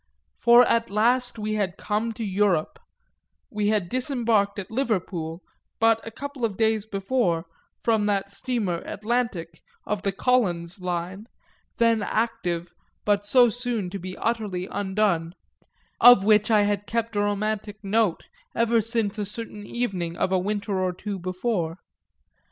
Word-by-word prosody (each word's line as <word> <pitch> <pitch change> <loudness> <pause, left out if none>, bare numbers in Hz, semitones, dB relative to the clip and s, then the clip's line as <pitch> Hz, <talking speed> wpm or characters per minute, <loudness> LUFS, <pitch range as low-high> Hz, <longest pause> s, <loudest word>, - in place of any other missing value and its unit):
For 240 +1 +7
at 230 -1 +1
last 240 +4 +1
we 215 0 -2
had 200 -4 -1
come 215 +2 -1
to 225 - -5
Europe 195 - +1 0.7
we 210 -1 -1
had 210 -4 +1
disembarked 235 - 0
at 200 0 -6
Liverpool, 185 -9 -2 0.4
but 225 0 +4
a - - -6
couple 280 +2 -7
of 215 -4 0
days 220 -1 +1
before, 195 -5 0 0.4
from 220 -3 +2
that 200 -1 0
steamer 210 -6 -1
Atlantic, 210 -7 -2 0.2
of 210 -1 -2
the 195 - 0
Collins 190 -6 0
line, 180 +4 -4 0.5
then 230 -2 +3
active 180 -7 -2 0.3
but 205 -1 +2
so 240 +4 +5
soon 235 -5 -3
to 200 - -5
be 185 +1 -7
utterly 210 -6 -2
undone, 190 -4 0 0.6
of 245 -5 +8
which 215 0 +4
I 215 -2 +5
had 205 0 -1
kept 230 -1 -2
a - - +1
romantic 205 0 -2
note 205 -2 +1 0.3
ever 230 0 +3
since 225 -2 0
a - - 0
certain 210 0 -7
evening 185 -8 -3
of 185 - 0
a 190 - +3
winter 205 0 -2
or 185 -1 0
two 200 +2 -5
before. 185 -2 -2
210 Hz, 145 wpm, -25 LUFS, 190-230 Hz, 0.7 s, of